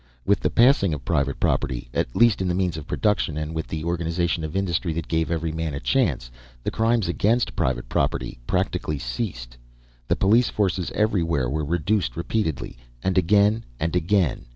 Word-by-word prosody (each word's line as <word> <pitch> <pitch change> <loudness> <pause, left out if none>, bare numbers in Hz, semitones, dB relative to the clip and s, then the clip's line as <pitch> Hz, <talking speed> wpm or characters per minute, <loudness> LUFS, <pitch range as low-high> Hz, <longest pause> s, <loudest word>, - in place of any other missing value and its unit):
With 100 - +3
the - - 0
passing 115 - +4
of 70 - -10
private 70 -4 0
property, 65 -4 0
at - - -1
least 115 -4 +4
in 95 - 0
the 90 - 0
means 90 -3 0
of 80 -2 -7
production, 105 -7 0
and 75 +1 -3
with 80 0 -3
the 80 -1 -4
organization 85 0 -1
of 80 +2 -5
industry 90 -3 0
that 80 -1 -4
gave 80 0 0
every 80 -1 -1
man 80 -2 -3
a - - -3
chance, - - 0 0.3
the - - -1
crimes 115 -2 +1
against 110 +7 +1
private 60 -1 -1
property 70 -3 -1
practically 75 - -1
ceased. 60 - -5 0.5
The - - +2
police 115 +5 +3
forces 95 -4 0
everywhere 85 - +1
were 75 +1 -1
reduced 85 - 0
repeatedly 85 - -2 0.2
and 95 -1 0
again 100 +4 +3 0.2
and 80 +2 -1
again. 90 -6 +1
85 Hz, 175 wpm, -24 LUFS, 75-100 Hz, 0.5 s, passing